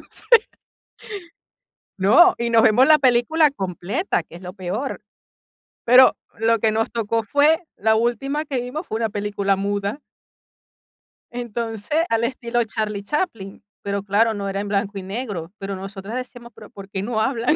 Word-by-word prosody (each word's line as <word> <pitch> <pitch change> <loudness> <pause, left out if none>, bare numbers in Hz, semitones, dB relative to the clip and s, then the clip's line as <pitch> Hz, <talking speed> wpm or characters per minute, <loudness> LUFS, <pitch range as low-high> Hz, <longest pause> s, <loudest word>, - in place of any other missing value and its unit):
entonces, 470 -1 +2 1.5
no, 270 - +6
y 235 0 -1
nos 230 -1 +5
vemos 240 +5 +5
la 310 -1 +6
película 275 +5 +3
completa, 195 - -2
que 165 - -14
es 175 - -13
lo 180 - -7
peor. 205 +9 -4 0.8
Pero 250 +2 +7 0.2
lo 225 0 +2
que 220 0 +2
nos 225 0 -1
tocó 225 0 -1
fue 290 - +3
la 220 +1 +2
última 245 +6 -1
que 270 -4 -2
vimos 255 +8 -5
fue 220 - -3
una 225 -1 -1
película 200 -1 -1
muda. 200 +4 -2 1.3
Entonces, 235 +5 -2
al 225 0 +1
estilo 240 -1 -1
Charlie 215 -2 -4
Chaplin, 225 - -4 0.2
pero 200 -1 -3
claro, 210 +3 +2
no 200 -2 -4
era 195 0 -3
en 205 - -5
blanco 200 0 -2
y 195 - -5
negro. 195 -5 -5
Pero 195 0 -5
nosotras 195 +3 -7
decíamos: 245 -1 -7
"¿Pero 215 - -13
por 195 -1 -12
qué 195 -2 -4
no 220 +2 -2
hablan? 245 +3 +1
225 Hz, 160 wpm, -21 LUFS, 200-250 Hz, 1.5 s, Pero